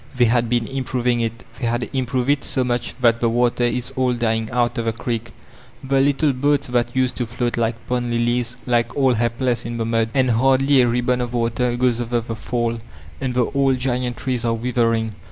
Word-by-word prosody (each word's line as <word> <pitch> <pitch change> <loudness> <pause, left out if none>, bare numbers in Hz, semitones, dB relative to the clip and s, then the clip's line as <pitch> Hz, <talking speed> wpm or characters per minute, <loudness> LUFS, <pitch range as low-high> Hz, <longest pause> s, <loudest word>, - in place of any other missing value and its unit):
They 120 - +5
had 120 0 +2
been 120 -1 +1
improving 125 -2 -1
it! 115 +1 -3 0.2
they 120 - -1
had 120 +1 -1
improved 130 0 0
it 145 -1 0
so 130 - 0
mudi 120 -1 -2
that 115 -1 +4
the 115 - +2
water 120 +1 +1
is 125 +2 -2
all 130 -2 +1
dying 110 -2 -1
out 120 +1 0
of 115 - -2
the 115 - +1
creek; 115 0 -4 0.5
the 135 0 +1
little 140 +1 +2
boats 145 +3 +1
that 120 0 0
used 130 -1 +1
to 120 - -2
float 120 +1 -2
like 115 0 0
pond 125 -1 -1
lilies 120 +1 0
lie 120 -2 +3
all 135 -3 +3
he^ 115 0 +1
less 125 -3 0
in 115 0 -5
the 115 - -1
mud, 115 0 +1
and 130 -2 +3
hardly 135 +3 +4
a 125 - +3
ribbon 125 +1 +1
of 120 0 -4
water 120 +1 0
goes 120 -1 +1
over 120 0 0
the 115 0 -5
fall, 115 0 -2 0.4
and 130 -2 -2
the 125 -1 +3
old 135 0 +1
giant 125 -1 -1
trees 125 -2 -2
are 115 -1 +1
withering. 115 -2 0
120 Hz, 215 wpm, -21 LUFS, 115-125 Hz, 0.5 s, They